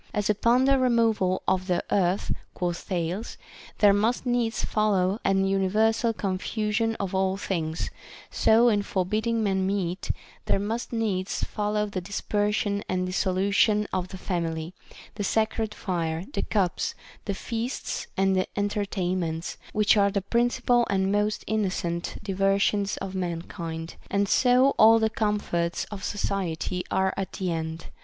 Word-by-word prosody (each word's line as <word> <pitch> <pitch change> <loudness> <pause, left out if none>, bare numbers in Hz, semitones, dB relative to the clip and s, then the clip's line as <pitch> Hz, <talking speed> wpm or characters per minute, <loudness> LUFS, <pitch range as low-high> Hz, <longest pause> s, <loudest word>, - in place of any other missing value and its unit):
As 210 0 +2
upon 235 +5 +3
the 275 0 +4
re 255 -1 +3
moval 220 -6 +2
of 185 0 +1
the 180 -2 +1
earth, 185 0 +1 0.2
quoth 175 -2 -1
Thales, 180 +4 -3 0.4
there 205 -1 +6
must 225 +6 +1
needs 240 -2 0
follow 205 -2 +1
an 195 0 +2
universal 215 +4 +2
confusion 215 +3 -1
of 195 -3 -4
all 190 0 +1
things, 165 -5 -2 0.4
so 230 +2 +4
in 210 -3 +3
forbidding 215 +4 0
men 190 -2 +1
meat, 190 -2 -2 0.4
there - - +2
must 220 +4 -3
needs 205 -5 -1
follow 210 0 -1
the 200 -3 -4
dispersion 205 +1 -1
and 185 0 0
dissolution 200 +3 +2
of 180 -1 -1
the 190 +1 -8
family, 165 -2 -3 0.4
the 205 - -4
sacred 220 +1 0
fire, 170 -2 -2
the - - -1
cups, 190 -5 0 0.3
the 200 - -2
feasts 235 +5 -4
and 190 -1 +2
enter 205 0 0
tainments, 175 -4 -2
which 210 0 +4
are 200 0 +4
the 200 -1 -1
principal 240 +2 +2
and 195 0 +1
most 210 +1 0
innocent 185 -5 -1
diver 195 0 +2
sions 200 0 +1
of 195 -1 -5
mankind; 165 -2 -4
and 200 0 +1
so 255 +5 +4
all 225 +1 +8
the 220 -1 +1
comforts 205 -6 -1
of 200 -2 -6
society 185 -3 -2
are 190 0 +1
at 195 -1 -4
end. 165 -3 -3
200 Hz, 145 wpm, -26 LUFS, 185-215 Hz, 0.4 s, all